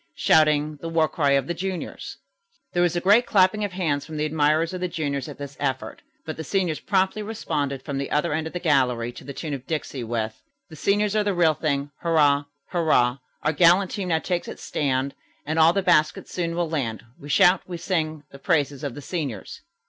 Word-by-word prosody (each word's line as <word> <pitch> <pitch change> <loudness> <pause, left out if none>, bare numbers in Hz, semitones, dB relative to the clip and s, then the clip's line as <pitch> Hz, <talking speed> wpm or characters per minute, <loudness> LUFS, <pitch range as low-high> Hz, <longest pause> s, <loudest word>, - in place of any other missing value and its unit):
Shouting 150 -1 +3
the 165 +3 -6
war 165 -1 +2
cry 145 -4 +1
of 135 -1 +2
the 175 - -2
juniors." 185 +1 -5 0.6
There 175 - +2
was 175 -1 +2
a - - +2
great 205 +7 +4
clapping 195 +1 +3
of 200 -3 -3
hands 155 -6 -1
from 155 -1 -8
the 150 - 0
admirers 155 +2 +1
of 185 - -5
the 180 - 0
juniors 150 -5 -3
at 145 - -9
this 140 -1 -8
effort, 135 -2 -3 0.2
but 155 - -5
the 160 - -4
seniors 175 -1 -1
promptly 190 +1 +1
responded 145 - -3
from 140 -1 -3
the 140 - -3
other 150 +2 0
end 160 +1 -1
of - - -9
the 180 - -3
gallery 125 -7 +1
to 120 - -12
the 140 - -7
tune 150 +2 -5
of 135 -2 -6
Dixie, 150 -5 -3
with: 110 -1 -3 0.3
"The 160 - -11
seniors 205 +5 +1
are 215 - +3
the 205 -2 0
real 165 -3 +4
thing. 145 -2 -2
Hurrah! 145 -4 +3 0.2
Hurrah! 140 -7 +2 0.2
Our 150 - +1
gallant 175 +5 +5
team 195 -3 -3
now 165 -2 +2
takes 175 +2 -2
its - - -8
stand, 135 -2 -1 0.3
And 155 +2 -1
all 160 +1 +7
the 195 +2 0
baskets 155 -4 +2
soon 170 -2 -2
will 175 -1 0
land. 130 -9 -3 0.2
We 145 - -10
shout, 175 +5 +5
we 180 -2 -5
sing, 155 -4 -2
the 140 - -12
praises 145 -4 0
of 140 -4 -4
the 145 - -8
seniors." 145 - -5
155 Hz, 215 wpm, -24 LUFS, 140-175 Hz, 0.6 s, all